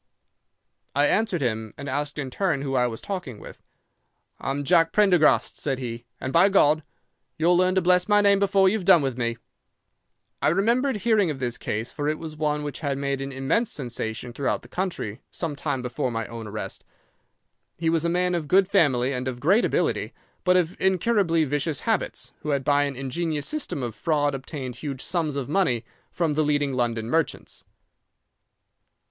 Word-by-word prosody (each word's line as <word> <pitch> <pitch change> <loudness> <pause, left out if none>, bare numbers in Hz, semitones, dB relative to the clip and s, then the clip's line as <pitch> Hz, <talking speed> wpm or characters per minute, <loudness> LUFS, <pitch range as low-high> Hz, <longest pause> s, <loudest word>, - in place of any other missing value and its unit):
"'I 145 - +4
answered 200 -2 +1
him, 110 -3 -2
and 140 - -7
asked 145 +2 -3
in 135 -3 -4
turn 160 -4 0
who 135 -1 -3
I 125 -2 +3
was 115 -2 -6
talking 175 - -5
with. - - -12 0.8
"'"I'm 140 +1 -2
Jack 165 +1 +4
Prendergast," 185 -6 +3
said 135 -3 -1
he, 120 -2 -6
"and 130 - -4
by 175 +4 +6
God! 155 -5 +4 0.6
You'll 170 +3 +3
learn 185 +1 +3
to 190 - +2
bless 180 +2 +3
my 205 0 +5
name 200 -1 +4
before 195 -1 +4
you've 200 +1 +1
done 170 -3 +6
with 135 -3 -1
me." 120 -1 -2 1.0
"'I - - +2
remembered 235 - +2
hearing 210 -3 +2
of 145 -3 -4
his 120 -2 -3
case, 110 +3 -3
for 145 -1 -3
it 155 - -1
was 155 -1 -7
one 150 -1 -1
which 145 -1 -5
had 140 -3 -2
made 140 -1 -2
an 135 0 -4
immense 135 - 0
sensation 120 -2 -4
throughout 135 +2 -1
the - - -13
country 175 - -4
some 160 -4 -4
time 140 -3 -2
before 125 +1 -2
my 115 -2 -3
own 115 -1 -7
arrest. 105 +1 -6 0.9
He 165 - -2
was 165 -1 +1
a 170 - +1
man 180 +1 +1
of 165 -4 -2
good 190 +5 +4
family 140 -9 +2
and 125 0 -3
of 125 -2 -4
great 190 - +3
ability, - - 0 0.3
but 180 0 +4
of 175 -1 0
incurably 190 -3 +2
vicious 145 +1 -1
habits, - - -1
who 150 - -6
had 140 -2 0
by 145 +1 +3
an 140 -1 -4
ingenious 145 +3 -2
system 300 - -3
of 120 -2 -3
fraud 145 +5 0
obtained 135 -2 -6
huge 140 -2 -5
sums 160 -5 -1
of 140 -3 -3
money 140 -9 +1 0.2
from 165 -3 -1
the 155 - +1
leading 145 -2 +1
London 120 -3 -1
merchants. 160 +4 -2
145 Hz, 185 wpm, -25 LUFS, 130-180 Hz, 1.0 s, by